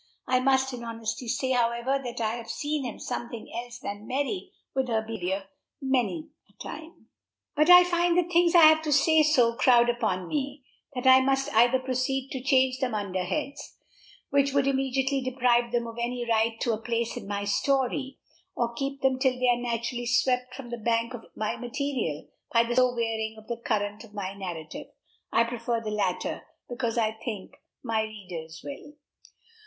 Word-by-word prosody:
I 255 0 +2
must 265 0 +2
in 240 -1 -6
honesty 230 +1 -4
say, 260 +3 -1
however, 240 +2 +1
that 245 -1 -5
I 220 -1 0
have 230 -1 -9
seen 295 -1 -2
him 235 - -5
something 235 -1 -6
else 235 0 -6
than 210 -4 -7
merry 285 +9 -2 0.2
with 265 -1 0
her 220 -2 0
behavior, 195 -3 -3 0.3
many 240 - -1 0.2
a - - -27
time. 315 - -10 0.5
But 305 +3 +3
I 360 0 +10
find 345 -1 +2
the 360 - +5
things 345 0 +3
I 340 - +9
have 315 0 +7
to 310 -1 -2
say 315 +3 +5
so 255 -7 +4
crowd 240 0 +5
upon 185 -6 -2
me, 280 -1 -3 0.3
that 250 - -4
I 260 0 +8
must 270 0 0
either 240 +3 +5
proceed 260 +1 -2
to 265 - -3
arrange 260 0 +2
them 255 -4 -1
under 190 -3 -2
heads, 285 +5 -4 0.5
which 280 -1 +3
would 280 -1 +3
immediately 270 0 +1
deprive 245 -2 +2
them 240 -1 0
of 230 0 -7
any 240 0 -2
right 225 0 +1
to 235 - +1
a 215 - -4
place 235 0 -2
in - - -7
my 200 0 -2
story, 265 +4 0 0.4
or 235 -1 -1
keep 275 +3 -4
them 260 -1 +2
till 260 -1 +2
they 255 -1 +3
are 240 0 +2
naturally 240 0 -2
swept 250 +1 +1
from 255 -3 -9
the 240 - -4
bank 230 +2 0
of 235 -2 -8
my 215 - -2
material 245 - -3 0.2
by 230 0 +5
the 235 +1 -2
slow 255 0 +3
wearing 220 -1 -2
of 220 - -13
the 235 +1 -4
current 210 -4 -2
of 215 -2 -15
my 195 -1 -4
narrative. 175 -5 -7 0.4
I 230 - +4
prefer 235 0 -2
the 220 -2 -5
latter, 195 -4 -2 0.2
because 240 -1 -2
I 220 -2 +2
think 220 -3 -6 0.3
my 225 -3 0
readers 180 -7 -7
will. 285 +1 -8
245 Hz, 185 wpm, -27 LUFS, 225-270 Hz, 0.5 s, I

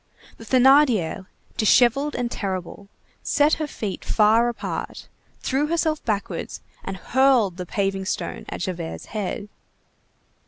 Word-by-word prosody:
The 225 - -11
Thénardier, 250 - +4 0.3
dishevelled 250 +6 +3
and 240 -1 -2
terrible, 195 0 -5 0.3
set 295 +2 +2
her 305 - -1
feet 210 -8 -5
far 225 +2 +3
apart, 240 - -5 0.3
threw 280 +3 0
herself 320 -1 0
backwards, 200 -5 -3 0.2
and 195 0 -5
hurled 245 -5 +2
the 180 -1 -6
paving 195 0 -1
stone 175 -2 -4
at - - -6
Javert's 175 -3 -4
head. 205 -1 -3
215 Hz, 120 wpm, -23 LUFS, 190-265 Hz, 0.3 s, Thénardier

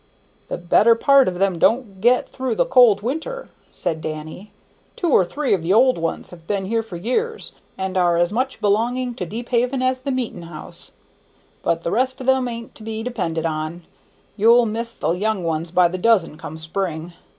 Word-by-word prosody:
"The - - -4
better 205 +6 +4
part 275 +3 +5
of 180 -1 -2
them 190 -2 +1
don't 215 -2 +1
get 245 +3 +3
through 260 -3 -3
the - - +2
cold 245 -6 +5
weather," 320 - -4 0.2
said 160 -1 -3
Danny. 155 +6 -7 0.4
"Two 345 -4 -1
or 190 - +6
three 285 +9 -1
of 190 - +1
the 170 +4 +1
old 255 -1 +4
ones 165 0 -3
have 170 -2 -14
been 200 -2 -1
here 225 +3 0
for 225 -5 -10
years, 435 - -2 0.2
and 190 0 -3
are 175 -2 +3
as 175 +3 +1
much 260 +3 -1
belonging 240 +5 +1
to 180 -6 -5
Deephaven 245 +5 -1
as 255 0 +1
the 255 - -5
meetin' 250 -8 -2
house; 155 -2 -8 0.7
but 165 0 -1
the 170 - -2
rest 260 +3 0
of 260 - -6
them 265 -1 +2
an't 230 -1 -7
to - - -12
be 220 0 -5
depended 175 -10 -2
on. 155 +2 -3 0.5
You'll 230 +3 +5
miss 230 +2 -3
the - - -1
young 200 +2 -1
ones 165 0 -2
by 180 +1 +4
the 185 +2 -5
dozen, 205 -6 +3
come 155 +1 -8
spring. 165 0 -4
215 Hz, 195 wpm, -21 LUFS, 175-250 Hz, 0.7 s, or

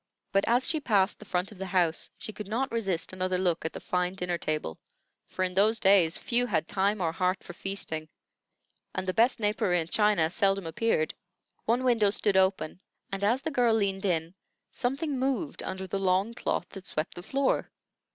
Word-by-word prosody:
But 195 0 +2
as 245 +3 +3
she 315 - +2
passed 205 -8 +2
the 215 - -11
front 185 0 -1
of 205 - -13
the 190 - -4
house, 175 -3 +1
she 215 - -7
could 210 -2 -7
not 245 +6 -1
resist 195 -7 -1
another 185 0 -1
look 180 -3 +1
at 160 - -3
the - - -6
fine 180 0 -1
dinner 180 -2 -2
table; 155 - -3 0.5
for 185 - -2
in 180 0 -1
those 215 +4 +4
days 190 -5 +4
few 245 +1 0
had 160 -7 0
time 200 +1 +1
or 165 -2 +1
heart 185 +3 0
for 175 - -9
feasting, 165 -5 -4 0.9
and 185 - -2
the 185 - 0
best 235 +4 +3
napery 205 -4 +1
and 165 0 -4
china 210 -7 +3
seldom 195 -1 +2
appeared. 165 -1 0 0.5
One 240 +3 +2
window 230 -5 +4
stood 205 0 +2
open, 190 -2 +2 0.3
and 195 0 -3
as 235 +6 +2
the 320 - -2
girl 245 -5 +3
leaned 200 -2 0
in, 165 -2 0 0.4
something 270 +2 -2
moved 275 +4 -1
under 190 0 -4
the 195 +1 -3
long 190 +4 +1
cloth - - -2
that 195 -2 -10
swept 155 +1 -3
the 175 - -8
floor. 270 +8 0
195 Hz, 195 wpm, -28 LUFS, 180-225 Hz, 0.9 s, those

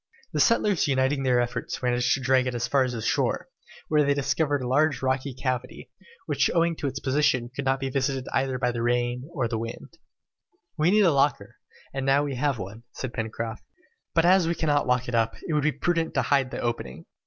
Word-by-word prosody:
The - - -1
settlers 210 -7 +3
uniting 135 +1 +1
their 125 -2 +2
efforts 120 +1 -3
managed 125 0 +2
to 135 - -5
drag 130 0 +3
it 125 - -2
as 120 0 -1
far 135 +2 +3
as 125 -1 -2
the 115 -2 -4
shore, - - 0 0.4
where 150 -1 +3
they 140 0 +2
discovered 145 0 0
a - - -3
large 145 +2 +2
rocky 130 +1 0
cavity, 130 -1 -4 0.3
which - - +1
owing 170 0 +2
to 145 - -2
its 135 0 -4
position 130 -3 +1
could 140 - -4
not 135 0 +1
be 135 0 -3
visited 135 -1 -1
either 130 -1 0
by 125 -1 0
the 120 -1 -4
wind 120 +1 0
or 135 -8 -1
rain. 115 0 -5 0.9
"We 160 +1 +2
needed 210 +1 +5
a 170 - +5
locker, 140 0 0 0.4
and 135 0 -3
now 135 +2 +3
we 145 -2 -3
have 135 +1 0
one," 100 +3 -7
said 130 -2 -5
Pencroft; 110 0 -4 0.5
"but 165 0 +4
as 180 -1 +5
we 170 - 0
cannot 145 -4 +1
lock 125 0 +1
it 120 - -4
up, 115 -1 +1
it 160 - -1
will 150 - +2
be 155 +2 +2
prudent 165 +3 -1
to 135 - +2
hide 135 +1 +2
the - - -6
opening. 115 - -4
130 Hz, 215 wpm, -26 LUFS, 125-145 Hz, 0.9 s, needed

